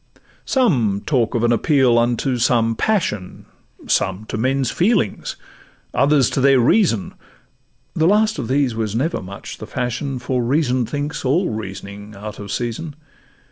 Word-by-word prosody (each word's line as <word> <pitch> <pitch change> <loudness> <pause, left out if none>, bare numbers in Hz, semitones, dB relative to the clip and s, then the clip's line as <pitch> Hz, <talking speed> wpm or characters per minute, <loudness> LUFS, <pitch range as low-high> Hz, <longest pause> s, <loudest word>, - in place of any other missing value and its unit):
Some 125 - +1
talk 125 -4 +1
of 115 - 0
an 120 - +3
appeal 125 0 +3
unto 120 +2 0
some 115 -1 +2
passion, 110 - -1 0.4
Some 105 +4 0
to - - -3
men's 130 +3 0
feelings, 185 - 0 0.6
others 140 0 +3
to 135 - 0
their 135 -1 +5
reason; 120 - +2 0.8
The 160 0 +2
last 210 -1 +3
of 120 - -3
these 135 -1 +1
was 110 -2 -3
never 145 +8 -1
much 100 +2 -9
the - - -8
fashion, 130 +2 -3
For 125 0 -1
reason 130 -2 +1
thinks 145 0 -4
all 155 +8 +1
reasoning 100 0 -7
out 105 +1 -8
of 100 -1 -7
season. 125 +8 -4
125 Hz, 145 wpm, -20 LUFS, 110-145 Hz, 0.8 s, their